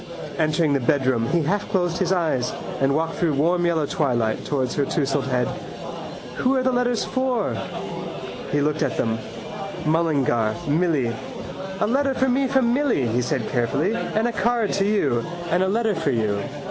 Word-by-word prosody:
Entering 155 -1 +2
the 140 - +3
bedroom 130 -3 +2
he 170 +4 +2
halfclosed 180 0 0
his 185 -1 +1
eyes 155 -9 +1 0.3
and 135 +1 +2
walked 160 +1 -1
through 160 -4 +1
warm 175 +4 +2
yellow 160 -3 +2
twilight 120 -7 0
towards 130 -4 -1
her 145 - +1
tousled 140 -1 0
head. 125 -2 +1 0.9
—Who 260 +2 +2
are 260 - +2
the 260 - +3
letters 245 -2 +1
for? 260 -4 0 1.0
He 145 - +2
looked 150 +1 0
at - - 0
them. 115 -1 0 0.7
Mullingar. 140 -9 +2
Milly. 150 -6 +2 0.7
—A - - +3
letter 270 +4 +1
for 265 0 +2
me 265 +2 +2
from 255 -3 +3
Milly, 260 - +2
he 120 +3 +1
said 130 -3 -1
carefully, 135 - +1
and 230 -1 0
a - - 0
card 230 0 +1
to 195 0 +2
you. 145 - +2 0.3
And 180 - +3
a 190 - +3
letter 220 +2 +1
for 160 -5 -1
you. 110 -5 +1
160 Hz, 170 wpm, -23 LUFS, 135-215 Hz, 1.0 s, the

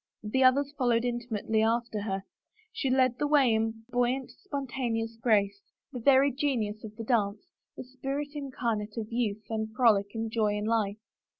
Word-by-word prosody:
The 260 +5 +1
others 275 +2 +4
followed 240 -2 +2
imitatively 230 -3 -1
after 225 -1 0
her; 195 -2 -3 0.5
she 270 - -1
led 255 -1 +2
the 295 - +1
way 280 -6 +4
in 225 0 -1
buoy 245 0 +2
ant, 265 -1 -7
spontaneous 250 -8 -3
grace, 200 -4 +2 0.3
the 250 - -4
very 275 +3 +5
genius 240 -6 -1
of 215 -1 -9
the 225 - -6
dance, 210 -3 0 0.3
the - - -5
spirit 270 +3 -4
incarnate 235 -7 -3
of 220 -1 -4
youth 220 -3 -1
and 220 0 -2
frolic 220 -6 +4
and 225 0 -3
joy 215 -2 +1
in 210 - -3
life. 215 -2 0
230 Hz, 170 wpm, -29 LUFS, 215-260 Hz, 0.5 s, very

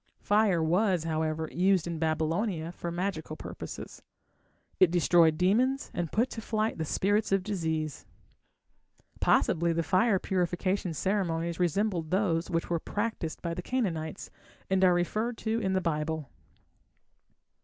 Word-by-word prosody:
Fire 205 -5 +2
was, 180 +1 +2
however, 160 0 -1
used 185 -1 +2
in 170 -2 -4
Babylonia 160 +2 -1
for 175 0 -5
magical 170 -3 -3
purposes. - - -8 0.8
It 185 - +6
destroyed 165 -1 +4
demons, 245 - +2
and 170 -3 -3
put 235 +4 +1
to 225 - -5
flight 220 -3 -1
the 160 - -1
spirits 205 +7 +1
of 195 -1 +2
disease. 160 -7 -3 1.1
Possibly 170 0 +3
the 165 0 0
fire 190 +5 +3
purification 180 -1 -1
ceremonies 170 -3 -1
resembled 180 -1 0
those 180 -3 +1
which 165 -1 -1
were 170 -1 0
practised 205 -4 -3
by 170 -1 -2
the 180 - -4
Canaanites, 175 -9 -3 0.4
and 190 0 +3
are 180 -1 +6
referred 215 +7 -1
to 225 0 -1
in 190 -4 -1
the 190 - +2
Bible. 155 -4 -2
175 Hz, 135 wpm, -29 LUFS, 165-200 Hz, 1.1 s, It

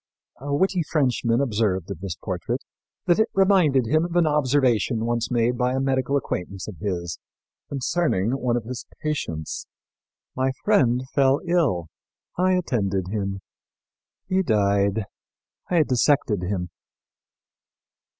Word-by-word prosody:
A 140 +2 -5
witty 190 +3 +2
Frenchman 125 -5 +2
observed 105 -7 0
of - - -6
this 95 -3 -4
portrait - - -4 0.4
that 175 - +3
it 220 - +3
reminded 185 -10 +4
him 155 +7 +2
of 175 0 -4
an 175 -1 +4
observation 130 -6 +2
once 120 -1 -1
made 120 0 +1
by 125 +1 +1
a - - 0
medical 135 +1 +1
acquaintance 95 -7 -4
of 105 -5 -8
his 85 -3 -3 0.5
concerning 135 - 0
one 125 -2 0
of 120 - -3
his 125 +2 -7 0.2
patients: 85 - -3 0.7
"'My 130 +1 0
friend 125 -1 +3
fell 135 0 +4
ill; 160 - +1 0.5
I 185 +1 +2
attended 100 - 0
him. 100 -2 -3 0.9
He 185 0 +2
died; 100 - +1 0.6
I 170 -3 +4
dissected 125 - +2
him.'" 90 -1 -3
125 Hz, 130 wpm, -24 LUFS, 100-150 Hz, 0.9 s, reminded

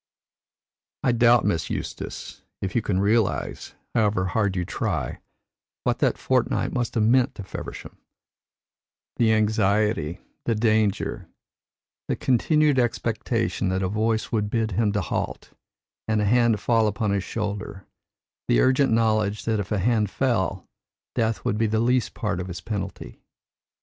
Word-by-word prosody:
I 125 - +3
doubt, 120 0 +4
Miss 85 -6 0
Eustace, - - -6 0.2
if 95 0 -4
you 120 - +3
can 95 -3 0
realise, 105 +1 0 0.2
however 105 -4 +2
hard 100 0 0
you 90 -1 -1
try, - - -2 0.6
what - - 0
that - - +2
fortnight - - 0
must 120 -1 -2
have 110 - +3
meant 130 +4 +3
to 100 - -7
Feversham 95 - -8 1.2
the 115 -2 +3
anxiety, 105 -5 +1 0.3
the 115 - +1
danger, 110 -2 0 0.8
the - - 0
continued 145 +3 +2
expectation 115 -3 -1
that 95 +1 0
a - - +1
voice 110 +3 0
would 105 -2 0
bid 110 -1 0
him 105 +2 +1
halt 100 -6 -3 0.5
and 110 -1 +1
a 105 - +1
hand 120 0 +3
fall 115 0 +2
upon 105 0 -1
his 100 -2 0
shoulder, 105 -2 -4 0.6
the - - +3
urgent 130 - +3
knowledge 110 -2 +1
that 110 -2 +1
if 100 - -4
the 105 - 0
hand 105 +1 +1
fell, 100 -7 -1 0.5
death 115 -1 -1
would 105 - 0
be 110 - +3
the 110 +1 0
least 125 0 +1
part 105 -4 -2
of 90 - -4
his 90 -2 -6
penalty. 100 +3 -6
110 Hz, 145 wpm, -24 LUFS, 100-115 Hz, 1.2 s, doubt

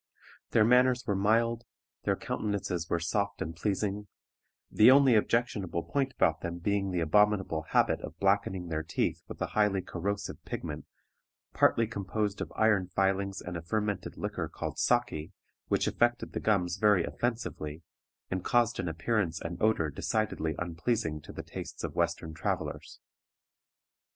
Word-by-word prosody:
Their 110 - +4
manners 125 +1 +4
were 105 - +1
mild, 115 +4 +2 0.4
their 100 - +2
countenances 100 -7 -3
were 85 - +1
soft 100 +4 -1
and 80 +1 -4
pleasing, 100 +3 -1 0.6
the 110 - +7
only 135 -1 +7
objectionable 105 -6 +1
point 135 -1 -1
about 80 -2 +2
them 85 0 -4
being 100 +2 0
the 90 -2 -1
abominable 95 -2 +2
habit - - +3
of - - -8
blackening 95 -3 +1
their 80 -1 -1
teeth 80 - -1
with - - -9
a - - -5
highly 105 -3 +2
corrosive 100 +2 -4
pigment - - -5 0.7
partly 115 - +4
composed 105 -1 -2
of - - -4
iron 105 -4 +3
filings 95 +1 0
and 90 - -6
a 85 - -4
fermented 105 +3 -2
liquor - - -3
called - - -5
saki, 80 +6 +1 0.3
which - - +1
affected 120 0 +1
the - - -2
gums 90 -4 +1
very 105 -3 +4
offensively, 85 -11 -3 0.5
and 95 -1 -2
caused 120 +1 +2
an 90 - -1
appearance 85 0 -1
and 85 +1 -6
odor 105 -8 +2
decidedly 90 -3 -1
unpleasing 85 -1 -1
to - - -11
the - - -7
tastes - - -7
of - - -3
Western 80 - -1
travelers. 80 - -4
100 Hz, 150 wpm, -30 LUFS, 85-110 Hz, 0.7 s, the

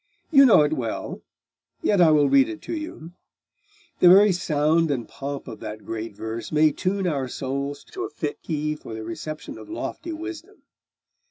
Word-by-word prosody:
You 275 -3 +8
know 185 -10 +7
it 150 +1 +1
well: 120 -7 -4 0.6
yet 200 -3 +3
I 170 - +7
will 150 -2 +5
read 275 - +4
it 330 -1 -6
to - - -5
you; 310 - -7 0.9
the 180 - +7
very 200 +3 +8
sound 160 -2 +1
and 130 -5 -2
pomp 140 0 -6
of - - -8
that 105 0 -8
great 110 -1 -5
verse 110 +2 -6
may 155 0 +4
tune 190 +5 -1
our 140 -6 -1
souls 140 +2 -4
to 370 - -5
a - - -6
fit 430 - -5
key 150 -1 -2
for 115 -6 -9
the 110 - -6
reception 155 +1 -7
of - - -12
lofty 335 +1 -5
wisdom. 340 +5 -8
155 Hz, 180 wpm, -24 LUFS, 140-205 Hz, 0.9 s, You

